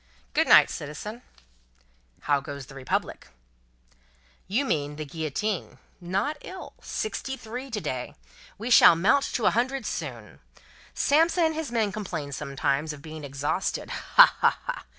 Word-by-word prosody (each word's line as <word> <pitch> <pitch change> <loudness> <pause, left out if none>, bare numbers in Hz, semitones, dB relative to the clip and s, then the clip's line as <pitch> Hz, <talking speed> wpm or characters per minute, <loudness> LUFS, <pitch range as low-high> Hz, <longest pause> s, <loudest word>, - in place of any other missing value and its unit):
"Good - - +2
night, - - +7
citizen." 210 +11 -7 1.0
"How 145 -1 +2
goes 140 -1 -8
the 135 - -14
Republic?" 135 -1 -3 1.2
"You 230 +10 0
mean 145 - -1
the 155 0 -5
Guillotine. 160 +7 -3 0.2
Not 195 - -2
ill. 370 -1 -9
Sixty 265 -11 -4
three 250 +3 -7
to 225 -4 -3
day. 130 -9 -4 0.4
We 230 +4 -4
shall 175 - +9
mount 205 +11 +3
to 230 - -1
a - - +5
hundred 255 +1 -1
soon. 120 - -6 0.6
Samson 330 +4 +3
and 320 0 +2
his 315 -4 -4
men 220 -4 +1
complain 175 -8 -5
sometimes, 140 +1 -1
of 145 -1 -12
being 155 -1 -8
exhausted. 140 +1 -2
Ha, - - +6
ha, - - +3
ha! - - -4
180 Hz, 145 wpm, -26 LUFS, -, 1.2 s, shall